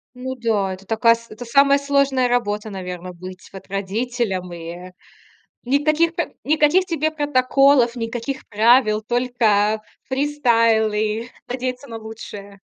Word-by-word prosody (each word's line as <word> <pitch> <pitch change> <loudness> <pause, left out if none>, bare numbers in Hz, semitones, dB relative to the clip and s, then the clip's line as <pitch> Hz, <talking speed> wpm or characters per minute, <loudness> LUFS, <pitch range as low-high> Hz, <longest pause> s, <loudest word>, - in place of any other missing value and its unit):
Ну 260 +1 -5
да, 215 -6 0
это 190 +1 -12
такая 230 +1 +4
с 230 0 -15
это 240 +3 -9
самая 275 +3 +4
сложная 280 -2 +1
работа, 215 -3 -1
наверно, 180 -1 -6
быть 185 +1 -10
вот 195 - -11
родителям, 200 0 -2
ы, - - -7 0.3
э, - - -14 0.7
никаких 305 +5 +2
п - - -3
никаких 310 +4 +3
тебе 315 -4 -1
протоколов, 275 -3 +3
никаких 240 +3 -5
правил, 220 0 +4
только 220 -4 +1 0.3
фристайлы, 230 -5 +1 0.2
надеяться 255 +2 -4
на 230 - -7
лучшее. 205 -2 -10
235 Hz, 125 wpm, -21 LUFS, 210-270 Hz, 0.7 s, такая